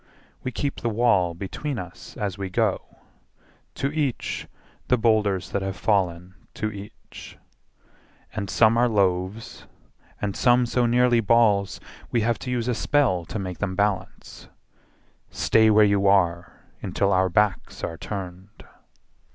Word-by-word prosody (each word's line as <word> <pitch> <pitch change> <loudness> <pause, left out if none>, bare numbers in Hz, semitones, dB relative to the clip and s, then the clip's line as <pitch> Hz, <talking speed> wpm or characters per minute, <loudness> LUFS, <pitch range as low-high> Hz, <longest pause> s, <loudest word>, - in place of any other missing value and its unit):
We 130 - -4
keep 140 +3 -3
the 120 - 0
wall 105 -7 +2
between 120 - -5
us 90 -4 -9
as 100 -3 -3
we 95 -1 -5
go. 90 - -1 0.8
To 140 +1 -2
each 150 -5 -2 0.4
the 125 - +3
boulders 105 -5 +1
that 100 - -1
have 95 0 -3
fallen 90 -3 0 0.2
to 110 0 -2
each. 100 0 -11 1.0
And 100 -3 -4
some 110 +5 +4
are 125 0 +3
loaves 95 +1 -1 0.5
and 100 -1 -3
some 120 0 +3
so 120 0 +1
nearly 120 0 +3
balls 105 -3 +2 0.3
We 120 - +1
have 115 +1 0
to 125 - -6
use 120 -1 -1
a 125 - +1
spell 120 -9 +1
to 110 - -5
make 90 -4 -5
them 95 -2 -2
balance: 100 -2 -3 0.8
"Stay 110 -1 +3
where 105 0 +6
you 100 -1 +2
are 85 -3 +1 0.2
until 100 +1 0
our 95 0 +2
backs 105 +1 0
are 85 - -3
turned!" 95 0 -8
105 Hz, 145 wpm, -24 LUFS, 95-115 Hz, 1.0 s, where